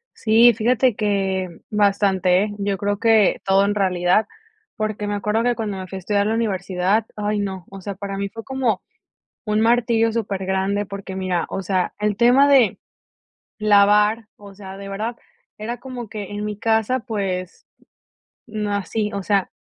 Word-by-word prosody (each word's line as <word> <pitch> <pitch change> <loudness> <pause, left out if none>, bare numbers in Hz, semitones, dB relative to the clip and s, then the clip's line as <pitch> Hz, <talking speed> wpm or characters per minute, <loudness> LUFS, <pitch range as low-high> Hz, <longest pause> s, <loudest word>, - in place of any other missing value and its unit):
Sí, 230 +2 +5
fíjate 240 +2 +2
que 195 -3 0 0.2
bastante, 195 -3 +2
¿eh? 210 -1 -4
Yo 200 -1 -1
creo 205 +1 -2
que 220 -3 +4
todo 195 0 +4
en 205 +1 0
realidad, 185 +1 +2 0.5
porque, 215 -2 -3
me 205 - -1
acuerdo 210 +3 0
que 245 0 +1
cuando 210 -4 -4
me 185 - -6
fui 190 - -7
a - - -5
estudiar 200 +2 0
la 220 - 0
universidad, 195 -1 0
ay 210 0 -1
no, 190 -3 -4
o 195 0 -10
sea, 200 0 -5
para 200 0 -5
mí 200 0 -3
fue 225 +2 -9
como 255 -7 -1 0.6
un 210 0 0
martirio, 230 0 +2
súper 200 -4 -3
grande, 190 +2 0
porque 195 -1 -7
mira, 185 -2 -1
o 195 - -4
sea, 185 -1 -1
el 210 -1 0
tema 245 +5 +5
de 265 -7 +4 0.8
lavar, 210 +1 +4
o 200 -1 -13
sea, 190 -1 -10
de 195 0 -8
verdad, 215 +4 -3 0.4
era 235 +3 -5
como 250 -2 -7
que 205 -3 -7
en 205 0 -4
mi 210 -1 -4
casa, 225 +3 +1
pues, 195 -6 -4 0.8
no 210 -2 -3
hací 210 +1 -2
o 200 - -3
sea, 200 -1 +1
205 Hz, 175 wpm, -21 LUFS, 195-220 Hz, 0.8 s, Sí